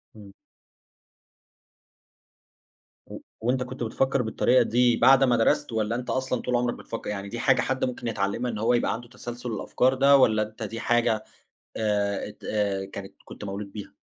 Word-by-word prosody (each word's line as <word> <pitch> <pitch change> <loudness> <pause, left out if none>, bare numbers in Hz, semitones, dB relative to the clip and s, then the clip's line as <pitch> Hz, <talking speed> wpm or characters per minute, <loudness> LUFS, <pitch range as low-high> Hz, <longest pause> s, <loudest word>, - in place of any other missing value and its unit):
إمم. 105 -2 -13 2.7
و - - -9 0.2
وأنت 125 +3 0
كنت 125 0 -6
بتفكّر 135 +4 0
بالطريقة 120 +2 +3
دي 120 0 +3
بعد 135 +2 +6
ما 125 -2 +4
درست 145 +5 +2
والّا 110 0 -1
أنت 125 +1 -5
أصلًا 130 -2 -1
طول 125 - -1
عُمرك 120 0 0
بتفكّر؟ 115 - -7
يعني 100 -1 -4
دي 120 - -5
حاجة 130 -1 +3
حد 130 +2 -1
ممكن 125 -1 -5
يتعلّمها 105 +3 -1
إن 110 - -5
هو 110 +3 +2
يبقى 120 - +1
عنده 120 +1 -7
تسلسل 120 0 -7
الأفكار 125 +4 +1
ده 140 +1 +5
والّا 110 -5 +4
أنت 110 +1 -5
دي 115 +2 -5
حاجة 120 -3 +1 0.5
آآ 105 -2 0
اد - - -12
آآ 100 -2 -1
كانت 100 0 -9
كنت - - -10
مولود 100 0 -6
بيها؟ 105 -1 -9
115 Hz, 170 wpm, -26 LUFS, 105-125 Hz, 2.7 s, بعد